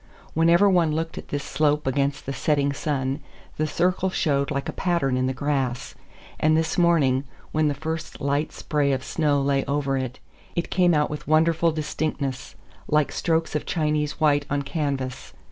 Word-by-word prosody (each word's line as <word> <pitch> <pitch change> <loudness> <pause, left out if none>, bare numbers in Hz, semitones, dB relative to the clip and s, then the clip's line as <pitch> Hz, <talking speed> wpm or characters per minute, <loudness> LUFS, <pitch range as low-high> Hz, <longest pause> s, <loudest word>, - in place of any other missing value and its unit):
Whenever 170 +5 +5
one 175 -5 +3
looked 165 +1 -3
at - - -11
this 145 -1 -3
slope 150 -1 +1
against 140 +2 0
the 135 - -3
setting 140 -1 +1
sun, 140 -2 -2 0.4
the 155 - 0
circle 180 +4 +1
showed 140 -7 0
like 140 -1 -2
a - - -2
pattern 170 -8 0
in 130 0 +1
the - - 0
grass; 130 -2 -2 0.5
and 155 0 +3
this 160 -1 0
morning, 155 -7 +3 0.3
when 155 0 +2
the 145 - 0
first 160 +3 -5
light 140 +2 0
spray 145 -2 0
of 130 0 -2
snow 150 -3 +1
lay 140 0 +1
over 140 -1 0
it, 130 -1 -4 0.4
it 170 - -2
came 180 -3 +4
out 150 0 +1
with 150 - -6
wonderful 165 +2 +3
distinctness, 150 -3 -3 0.3
like 150 -1 +2
strokes 165 -1 0
of 150 - -2
Chinese 150 -2 0
white 145 -2 +3
on 145 0 0
canvas. 140 -4 -3
150 Hz, 175 wpm, -24 LUFS, 140-160 Hz, 0.5 s, Whenever